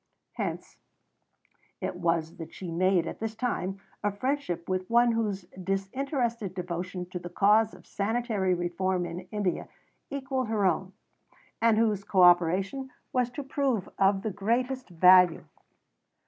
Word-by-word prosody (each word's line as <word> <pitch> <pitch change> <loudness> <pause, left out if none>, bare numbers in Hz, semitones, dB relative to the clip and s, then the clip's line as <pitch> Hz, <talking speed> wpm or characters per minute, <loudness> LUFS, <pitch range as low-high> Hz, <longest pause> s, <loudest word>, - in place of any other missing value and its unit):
Hence - - -5 1.0
it - - -3
was 165 -1 -1
that 165 -1 -9
she 180 -3 -6
made 180 0 +2
at - - -6
this 225 0 -4
time 195 -5 -2 0.2
a 205 - +2
friendship 205 - -2
with 185 0 -2
one 235 +1 +5
whose 210 -4 -1 0.2
disinterested 225 - -2
devotion 180 0 -4
to 180 - -4
the 175 - -8
cause 210 +4 +3
of - - -17
sanitary 210 -3 0
reform 175 +1 -1
in 175 +2 -7
India 205 -4 -2 0.4
equalled 265 -2 -2
her 215 -3 +1
own, 185 +1 0 0.7
and 230 -1 +4
whose 215 -3 +2
co 190 -2 +3
operation 185 +9 +3 0.2
was 250 -1 +2
to 285 +4 -6
prove 265 -6 -1
of 195 0 +3
the 220 - -1
greatest 245 +6 -1
value. 180 0 +6
195 Hz, 140 wpm, -28 LUFS, 180-230 Hz, 1.0 s, value